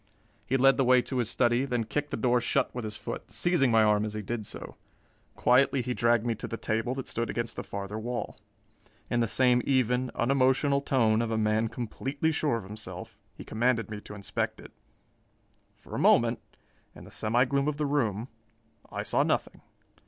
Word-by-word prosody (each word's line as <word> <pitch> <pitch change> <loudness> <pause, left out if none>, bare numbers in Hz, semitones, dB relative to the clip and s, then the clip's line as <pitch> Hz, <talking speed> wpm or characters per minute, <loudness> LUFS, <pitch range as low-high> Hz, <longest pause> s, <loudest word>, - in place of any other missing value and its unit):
He 135 - +2
led 135 +1 +5
the 135 - +3
way 125 0 +5
to 130 - -4
his 115 -3 0
study, 120 +1 +2
then 125 -4 -1
kicked 145 +6 -3
the - - -3
door 125 -1 +2
shut 120 - 0
with 125 -2 -4
his 105 -1 -6
foot, - - -6
seizing 175 -7 +2
my 115 -1 +5
arm 105 -1 +3
as 110 0 -4
he 105 - -4
did 110 0 -4
so. - - -8 0.6
Quietly 125 +2 +3
he 125 - -2
dragged 120 -1 +2
me 120 - +1
to - - -4
the 115 - -5
table 115 +4 -1
that 135 - -5
stood 115 0 -2
against 115 -1 -3
the - - -5
farther 100 +2 -5
wall. 120 +2 -4 0.7
In 120 - +2
the 115 - +2
same 125 +2 +3
even, 130 -1 +1
unemotional 135 +2 +2
tone 115 -5 +2
of 115 - -1
a 110 - -1
man 110 +1 +1
completely 135 +6 -2
sure 145 -4 0
of 115 - -7
himself, 105 +3 -8 0.2
he - - -9
commanded 115 -1 0
me 105 -1 -5
to 105 - -10
inspect 100 -1 -3
it. - - -12 1.0
For - - -15
a - - -2
moment, - - +4 0.6
in - - -12
the - - -13
semi 120 +4 +1
gloom 140 +2 0
of 150 -1 -1
the 150 - 0
room, 120 -6 0 0.6
I - - -3
saw - - +1
nothing. - - -1
120 Hz, 200 wpm, -28 LUFS, 110-130 Hz, 1.0 s, led